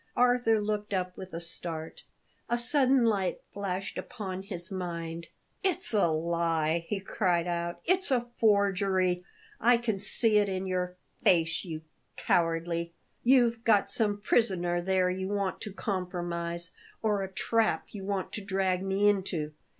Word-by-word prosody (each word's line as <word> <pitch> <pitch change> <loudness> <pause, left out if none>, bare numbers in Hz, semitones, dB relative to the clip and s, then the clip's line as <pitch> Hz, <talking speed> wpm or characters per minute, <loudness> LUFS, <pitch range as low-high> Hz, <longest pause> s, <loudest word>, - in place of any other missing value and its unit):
Arthur 245 -3 +4
looked 210 -1 -2
up 180 -1 -2
with 190 0 -9
a 165 - -4
start; 165 -1 -4 0.5
a 240 - +2
sudden 260 0 +3
light 200 -5 +1
flashed 195 -1 -3
upon 190 -5 -5
his 185 -2 -5
mind. 170 -3 -4 0.4
"It's 370 -8 +1
a 205 -5 +4
lie!" 165 0 0
he 210 - -2
cried 180 -3 0
out. 170 -1 -3
"It's 370 +1 +2
a 245 -3 +2
forgery! 195 -4 +2 0.4
I 240 0 +5
can 225 -4 -2
see 210 +1 +3
it 205 -1 +1
in 190 0 -2
your 180 -1 -2 0.3
face, 165 -6 +3
you 160 -4 -6 0.3
cowardly 170 0 0 0.3
You've 240 -2 +4
got 210 -4 +3
some 205 -3 +2
prisoner 180 -5 +2
there 185 0 +2
you 190 +1 -3
want 200 -1 -2
to 210 - -5
compromise, 175 -3 -2 0.3
or 210 -2 +1
a 190 0 -4
trap 225 +3 +1
you 200 -2 -7
want 195 -1 -2
to 210 - -4
drag 190 -2 0
me 195 +2 +2
into. 185 -7 0
190 Hz, 150 wpm, -29 LUFS, 175-210 Hz, 0.5 s, I